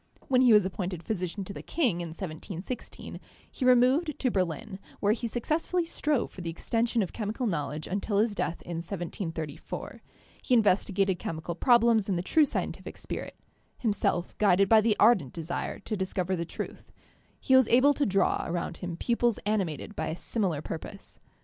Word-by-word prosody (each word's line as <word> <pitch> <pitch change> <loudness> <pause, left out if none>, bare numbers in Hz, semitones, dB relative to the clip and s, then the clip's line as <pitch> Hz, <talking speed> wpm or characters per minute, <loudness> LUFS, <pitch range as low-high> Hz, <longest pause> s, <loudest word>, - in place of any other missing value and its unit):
When 255 -1 +4
he 250 -2 +6
was 210 -3 +6
appointed 180 -2 -4
physician 185 0 -3
to 200 - -7
the - - -7
king 235 - 0
in 170 - -4
1716, 175 +6 -7 0.3
he - - -5
removed 255 +6 +4
to 255 - 0
Berlin, 185 +1 -2 0.2
where 205 +1 +3
he 235 +1 -3
successfully 315 +9 -1
strove 300 -5 -1
for 185 - -9
the 170 - -4
extension 230 +6 0
of 185 - -6
chemical 220 +3 -3
knowledge 150 -6 -2
until 200 +2 -1
his 215 +1 +2
death 175 -4 -3
in 170 -1 -5
1734. 165 -3 -5 0.4
He 255 - +2
investigated 195 -3 +2
chemical 160 +1 -4
problems 230 +1 +4
in 190 - +1
the 175 - -1
true 310 +10 +4
scien - - -2
tific - - -10
spirit; - - -6 0.4
himself 205 -6 0
guided 195 -2 +4
by 220 +1 +6
the 215 -1 +2
ardent 205 - +4
desire 170 +1 -3
to 215 - -4
discover 190 -1 -1
the 170 -1 -3
truth, - - -7 0.5
he 260 - +3
was 260 -3 +6
able 260 +4 +5
to 285 - 0
draw 195 -5 +2
around 170 0 -3
him 175 -2 -5
pupils 235 0 +1
animated 205 -3 -1
by 160 - -2
a 160 - -2
similar 180 -6 -1
purpose. 195 +5 -7
200 Hz, 175 wpm, -28 LUFS, 175-235 Hz, 0.5 s, he